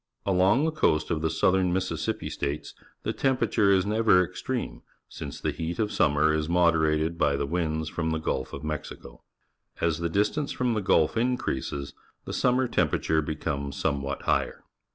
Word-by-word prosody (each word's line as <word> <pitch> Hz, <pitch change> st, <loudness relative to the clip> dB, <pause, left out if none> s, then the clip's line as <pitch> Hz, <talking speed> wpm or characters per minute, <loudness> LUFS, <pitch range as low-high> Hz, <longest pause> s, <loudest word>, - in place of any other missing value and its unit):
Along 95 Hz, +9 st, +3 dB
the 160 Hz, -, +1 dB
coast 85 Hz, -, +1 dB
of 80 Hz, -, 0 dB
theSoutheraJMississippi 90 Hz, +3 st, 0 dB
States 70 Hz, +1 st, -4 dB, 0.3 s
the -, -, -1 dB
temperature 125 Hz, -6 st, +2 dB
is 95 Hz, -1 st, +3 dB
never 105 Hz, -3 st, +4 dB
extreme, -, -, -4 dB, 0.3 s
since 70 Hz, -, -8 dB
the -, -, -1 dB
heat 85 Hz, +1 st, -4 dB
of 105 Hz, -1 st, 0 dB
suimner 75 Hz, +1 st, +3 dB
is 80 Hz, 0 st, -2 dB
moderated 80 Hz, -2 st, +2 dB
by 70 Hz, -3 st, +3 dB
the 70 Hz, 0 st, -1 dB
winds 80 Hz, 0 st, -1 dB
from 80 Hz, +1 st, -2 dB
the 80 Hz, -, 0 dB
Gulf 65 Hz, -4 st, -2 dB
of 70 Hz, -, -7 dB
Mexico. 75 Hz, -1 st, -6 dB, 0.6 s
As 85 Hz, -1 st, 0 dB
the 85 Hz, 0 st, -1 dB
distance 105 Hz, -, 0 dB
from 125 Hz, -2 st, 0 dB
the 110 Hz, -, -1 dB
Gulf 80 Hz, -1 st, +2 dB
increases, 110 Hz, -, -2 dB, 0.3 s
the -, -, -5 dB
sunmier 125 Hz, 0 st, +1 dB
temperature 80 Hz, -1 st, +1 dB
becomes 70 Hz, -2 st, -3 dB
somewhat 70 Hz, -2 st, -2 dB
higher. -, -, 0 dB
85 Hz, 155 wpm, -27 LUFS, 75-100 Hz, 0.6 s, never